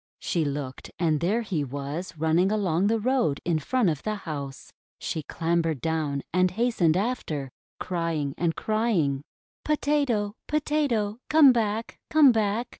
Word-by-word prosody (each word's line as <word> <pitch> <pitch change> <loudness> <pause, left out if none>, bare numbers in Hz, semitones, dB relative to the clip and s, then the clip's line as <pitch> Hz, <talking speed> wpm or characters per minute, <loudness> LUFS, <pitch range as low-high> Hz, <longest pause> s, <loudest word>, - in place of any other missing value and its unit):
She 170 - -1
looked, 140 -2 -4
and 160 -3 +1
there 210 +9 +1
he 175 -9 -1
was 145 +6 -5
running 160 +5 +2
along 195 -3 +1
the 225 +2 +2
road 240 - +1
in 165 -3 +1
front 245 - +1
of 155 -4 0
the 215 0 -2
house. 145 -8 -7 0.2
She 160 - -3
clam 170 +3 0
bered 160 -4 -2
down 150 -2 -1
and 185 0 +3
hastened 185 -5 +1
after, 165 - -2 0.3
crying 165 -5 -2
and 170 -2 0
crying: 210 - 0 0.2
— - - -90
"Potato! 285 -9 +1
Potato! 280 -8 0
Come 310 -3 +8
back! 225 -1 -2
Come 305 -4 +7
back! 220 +1 0
185 Hz, 150 wpm, -26 LUFS, 155-230 Hz, 0.3 s, Come